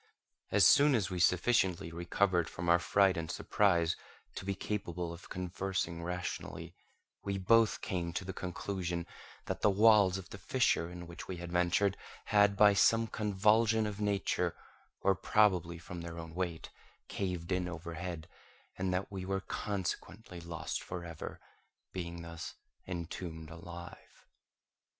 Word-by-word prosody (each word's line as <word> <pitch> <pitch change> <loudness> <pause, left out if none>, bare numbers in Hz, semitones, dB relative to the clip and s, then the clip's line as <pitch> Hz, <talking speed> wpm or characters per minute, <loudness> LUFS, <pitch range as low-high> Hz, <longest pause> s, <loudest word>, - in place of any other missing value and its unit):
As - - +5
soon 145 -1 +7
as 100 -4 0
we 90 - -2
sufficiently 90 -2 +2
recovered 85 0 +1
from 85 0 -4
our 85 +1 +6
fright 95 +1 +3
and 80 -1 -3
surprise 85 -5 +2 0.4
to - - -6
be 100 0 -1
capable 90 -4 -3
of 85 - -12
conversing 90 -2 -3
rationally, 90 +1 -5 0.5
we 100 -1 -2
both 115 +3 +4
came 85 -2 -2
to 95 - -3
the 95 - -4
conclusion 90 -1 -3 0.4
that - - -3
the - - +5
walls 100 -2 +5
of 95 - -9
the 100 - -8
fissure 110 -6 +1
in 90 0 -8
which 85 0 -9
we 95 - -4
had 85 0 -7
ventured 90 +3 +2 0.3
had, 100 -2 +4
by 105 0 +7
some 115 +3 +4
convulsion 110 +1 +2
of 105 0 -4
nature, 100 -4 0 0.5
or 100 - +4
probably 90 -4 +2
from 90 0 -8
their 85 0 -7
own 80 -1 -7
weight, 85 -2 -3 0.4
caved 90 -3 -3
in 90 -1 +1
overhead, 85 -1 -6 0.5
and 95 0 0
that 90 +2 -2
we 95 -2 -5
were 95 +1 -1
consequently 95 -1 -4
lost 85 -1 -4
for 90 -1 -6
ever, 85 -2 -7 0.5
being 85 -2 -5
thus 85 -1 -7 0.3
entombed 85 -2 -5
alive. 85 +1 -11
90 Hz, 145 wpm, -33 LUFS, 85-100 Hz, 0.5 s, soon